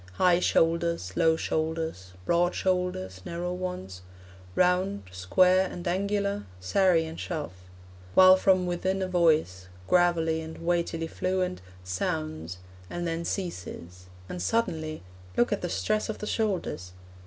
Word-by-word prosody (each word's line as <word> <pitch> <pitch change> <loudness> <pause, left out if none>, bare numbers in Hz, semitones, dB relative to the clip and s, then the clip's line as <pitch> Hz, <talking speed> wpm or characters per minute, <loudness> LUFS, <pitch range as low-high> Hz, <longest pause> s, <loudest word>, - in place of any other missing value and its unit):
High 180 - +4
shoulders, 165 - +1
low 160 0 +4
shoulders, 160 - -3
broad 175 +1 +2
shoulders, 180 - -1
narrow 175 - -3
ones, 180 - -5 0.5
Round, 185 +3 +2
square, 180 - +3
and 175 +1 -6
angular, 200 - 0
serry 165 - +3
and 160 +1 -8
shove; 155 - -4 0.6
While 185 0 +9
from 185 -1 +3
within 185 +2 -1
a - - -1
voice, 160 - +2 0.2
Gravely 165 -2 +3
and 160 0 -8
weightily 170 -1 0
fluent, 185 +2 -2 0.2
Sounds; 80 -2 -3 0.3
and 175 0 -4
then 165 0 -2
ceases; 90 - -5 0.2
and 180 - -5
suddenly 160 - -1 0.3
(Look 120 - +3
at - - -2
the 175 - -2
stress 215 +5 0
of 220 - -3
the - - -6
shoulders!) 190 - -2
170 Hz, 130 wpm, -28 LUFS, 155-185 Hz, 0.6 s, While